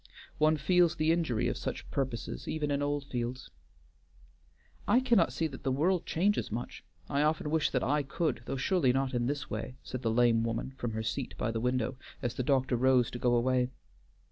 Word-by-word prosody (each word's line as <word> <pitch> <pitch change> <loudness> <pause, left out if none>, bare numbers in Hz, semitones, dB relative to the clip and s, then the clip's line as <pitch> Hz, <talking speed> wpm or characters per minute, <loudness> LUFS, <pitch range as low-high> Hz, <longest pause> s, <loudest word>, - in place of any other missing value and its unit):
One 155 +1 +4
feels 170 +3 +3
the 155 -1 +2
injury 160 -10 +1
of - - -1
such - - -5
purposes 130 -4 -3
even 150 -2 -1
in 140 0 0
Oldfields." 135 -4 -3 1.4
"I 245 - +5
cannot 235 -9 +3
see 165 - -1
that 140 -4 -5
the 135 - -1
world 170 +6 +1
changes 195 - +1
much. 120 +3 -5 0.2
I 140 - 0
often 150 0 +1
wish 160 -1 +2
that 125 - 0
I 145 +2 +2
could, 150 +3 -2
though 135 - -2
surely 135 -2 +2
not 135 0 0
in 120 -1 0
this 145 0 -3
way," 115 +4 -4
said 130 - -5
the 115 - 0
lame 115 0 +3
woman 115 +3 -2
from 120 -3 -4
her 110 0 -2
seat 130 +3 -3
by 115 - -1
the 115 -1 -2
window, 125 0 0 0.2
as 120 -3 -2
the - - -3
doctor 130 -1 +2
rose 125 -1 +3
to 120 - -6
go 120 0 +3
away. 125 +1 +2
130 Hz, 195 wpm, -31 LUFS, 120-155 Hz, 1.4 s, I